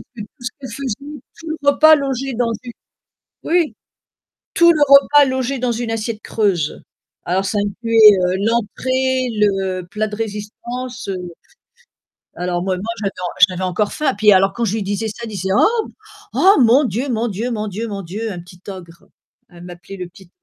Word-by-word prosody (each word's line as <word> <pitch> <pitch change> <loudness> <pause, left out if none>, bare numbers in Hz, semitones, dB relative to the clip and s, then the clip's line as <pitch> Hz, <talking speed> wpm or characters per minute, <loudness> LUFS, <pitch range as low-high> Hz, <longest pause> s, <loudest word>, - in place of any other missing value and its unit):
que 215 - -7
tout - - -6 0.2
ce 245 - -3
qu'elle 265 - -8
faisait, 255 -3 -4 0.4
tout 325 -1 -8
le 315 - -3
repas 310 +2 +6
logeait 270 -2 -2
dans 230 0 0
une 240 - -7 0.7
oui! 335 -2 +1 0.8
Tout 340 0 +6
le 305 - -2
repas 280 +1 +7
logé 260 0 -2
dans 245 -1 0
une 230 0 -3
assiette 225 -1 -3
creuse. 190 -9 -1 0.4
Alors 185 +3 0
ça 205 - -1
incluait, 215 +1 +5
heu, 180 +1 +1
l'entrée, 255 +3 0
le 190 -3 0
plat 215 +2 -1
de 210 - -7
résistance, 235 +3 -6
heu, 190 -1 -2 1.2
alors 175 0 -2
moi 190 -1 -1
moi 195 - -6 0.2
j'avais 195 - -1
en 180 - -3 0.2
j'avais 185 0 -5
encore 185 +3 -1
faim 295 -3 0
puis 210 0 +5
alors 195 0 +4
quand 235 - -3
je 215 +1 -1
lui 215 - -2
disais 205 +3 -2
ça, 220 +2 -8
elle 230 - -5
disait: 190 -2 -4
«Oh! 450 0 +2 0.5
Oh! 390 +2 +6
Mon 245 +5 +5
Dieu, 245 +6 -2
mon 235 0 -1
Dieu, 220 +6 -3
mon 215 -1 -3
Dieu, 215 +4 -4
mon 200 -2 -5
Dieu! 210 +6 -5
Un 175 - -6
petit 175 +1 -15
ogre», 170 -3 -11 0.4
elle 175 0 -14
m'appelait 180 +2 -10
le 180 -1 -6
petit 180 0 -18
220 Hz, 190 wpm, -19 LUFS, 195-255 Hz, 1.2 s, repas